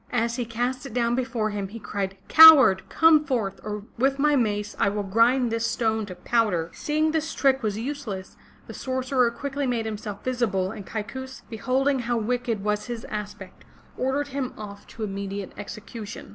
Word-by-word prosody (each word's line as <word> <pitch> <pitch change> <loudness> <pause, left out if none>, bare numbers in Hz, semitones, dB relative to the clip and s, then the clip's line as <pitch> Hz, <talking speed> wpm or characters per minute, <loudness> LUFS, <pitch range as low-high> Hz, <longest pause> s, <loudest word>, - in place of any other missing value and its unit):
As 235 0 0
he 245 - -2
cast 245 +4 -3
it 245 - -10
down 235 -1 +1
before 235 -3 -1
him, 200 -1 -3
he 215 +4 -9
cried: 200 -3 -4
Coward, 280 -12 +9
come 320 -2 +5
forth 235 -10 -2
or 210 -1 -5 0.2
with 270 +2 +2
my 295 +1 +3
mace 210 -4 -1
I - - +3
will 205 +1 -2
grind 230 +5 +3
this 230 0 0
stone 220 -2 -1
to 180 - -8
powder!" 180 -4 0
Seeing 310 +1 0
his 320 0 -1
trick 270 -1 +2
was 210 -2 -2
useless, 225 -7 -5 0.3
the - - -9
sorcerer 260 -1 0
quickly 280 +3 -4
made 235 -3 -1
him 215 -2 -4
self 205 -2 -7
visible 220 -7 0
and 210 -3 -9
Kaikous 260 +5 -6
beholding 260 +5 0
how 240 0 -1
wicked 230 -2 -2
was 210 0 -1
his 235 -2 -5
aspect, 205 -3 -7 0.3
ordered 275 +3 -1
him 270 -2 -3
off 200 -1 -9
to 225 - -8
immediate 200 -1 -4
execution. 215 - -8
230 Hz, 180 wpm, -25 LUFS, 210-260 Hz, 0.3 s, Coward